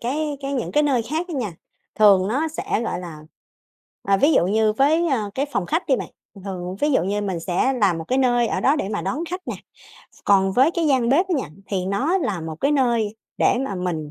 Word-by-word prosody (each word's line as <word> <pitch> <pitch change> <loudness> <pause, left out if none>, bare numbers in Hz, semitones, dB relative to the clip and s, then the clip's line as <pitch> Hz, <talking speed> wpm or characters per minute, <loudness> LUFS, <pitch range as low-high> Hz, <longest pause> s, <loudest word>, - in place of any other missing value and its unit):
cái 290 +4 -2
cái 275 0 -4
những 255 -4 -3
cái 295 - +3
nơi 270 -5 +2
khác 320 +9 -3
ấy - - -4
nha, 230 -9 -3 0.5
thường 200 -3 +5
nó 280 +9 0
sẽ, 315 -7 -2
gọi 200 - -3
là, 170 -4 -8 0.8
à, 195 0 +2
ví 290 +10 +3
dụ 175 - +3
như, 215 +2 +2
với, 310 +8 +2
ơ, 220 -8 -1
cái 275 +2 -1
phòng 195 -3 -1
khách 330 +4 -1
đi 265 - +3
bạn, - - -5 0.3
thường 195 -2 -14
thường 185 -2 -5
ví 295 +1 +2
dụ - - +3
như 200 +3 -1
mình 190 -5 -3
sẽ 180 +10 0
làm 200 -9 +1
một 160 - -6
cái 260 - +1
nơi 245 -2 +2
ở 185 - -1
đó 270 +9 +3
để 195 - -2
mà 210 0 -3
đón 305 +6 -2
khách 365 +1 -4
nè. - - -3 0.7
Còn 195 -1 +3
với 265 +9 +4
cái 335 -1 -1
gian 260 -5 +2
bếp 315 +9 +3
á - - -1
nha, - - -4 0.2
thì 190 -2 -2
nó 275 - +1
là 200 - -2
một 160 -1 -6
cái 280 +2 +2
nơi 235 -6 +1 0.2
để - - +3
mà 265 -7 -3
mình 175 -5 -3
235 Hz, 245 wpm, -22 LUFS, 195-285 Hz, 0.8 s, thường